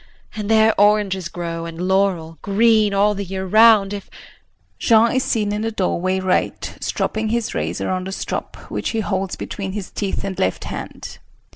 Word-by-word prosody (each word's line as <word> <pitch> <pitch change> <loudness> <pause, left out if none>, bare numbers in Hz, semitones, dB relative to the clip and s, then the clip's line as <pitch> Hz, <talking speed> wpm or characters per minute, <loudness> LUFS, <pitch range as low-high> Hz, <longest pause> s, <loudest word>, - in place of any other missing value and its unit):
And 210 -1 -4
there 220 0 +5
oranges 205 -4 +2
grow 170 -1 -5
and 165 0 -8
laurel 185 -5 0
green 215 +1 +3
all 200 +1 +3
the 200 0 -4
year 190 0 -4
round 215 0 +5
if 200 -1 -7 0.7
[Jean 230 0 +4
is 260 0 +1
seen 210 -3 0
in 210 - -2
the 225 - -1
doorway 185 -3 -1
R. 185 -1 +2 0.3
stropping 220 0 -2
his 235 0 -1
razor 85 +5 -2
on 185 0 -2
the 190 - -5
strop - - -4 0.2
which - - -2
he - - +1
holds 195 -2 -2
between 195 -2 -5
his 205 -2 -5
teeth 200 -2 -3
and 195 -1 -4
left 90 - 0
hand. - - -7
195 Hz, 175 wpm, -20 LUFS, 185-215 Hz, 0.7 s, there